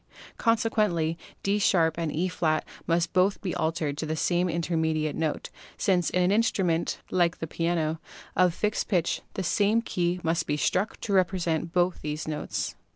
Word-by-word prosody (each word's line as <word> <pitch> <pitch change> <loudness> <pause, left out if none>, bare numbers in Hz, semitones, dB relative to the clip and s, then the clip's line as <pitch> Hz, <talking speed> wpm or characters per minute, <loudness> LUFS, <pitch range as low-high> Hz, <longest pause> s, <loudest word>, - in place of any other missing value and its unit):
Consequently 215 -8 +2 0.3
D 200 +1 +1
# 205 - +3
and 165 -1 +1
E^ 160 -1 0 0.3
must 165 0 +1
both 190 +1 +3
be 185 -4 -3
altered 155 -2 -1
to 155 0 -2
some 175 +3 +1
intermediate 160 -2 0
note, 160 -2 -2 0.3
since 180 -4 +2
in 180 - +1
an 180 - +3
instrument 190 -6 +1
(like 175 -1 +2
the - - -4
piano) 165 -1 -1 0.4
of 180 -1 +4
fixed 210 0 -1
pitch 175 -6 +1
the 190 - -2
same 210 +5 +2
key 175 -4 -1
must 165 0 0
be 145 - 0
struck 190 +7 0
to 205 - -2
repre 185 0 +2
sent 165 0 -1
both 175 0 +1
these 150 +1 -4
notes. 110 - -3
170 Hz, 160 wpm, -27 LUFS, 160-185 Hz, 0.4 s, of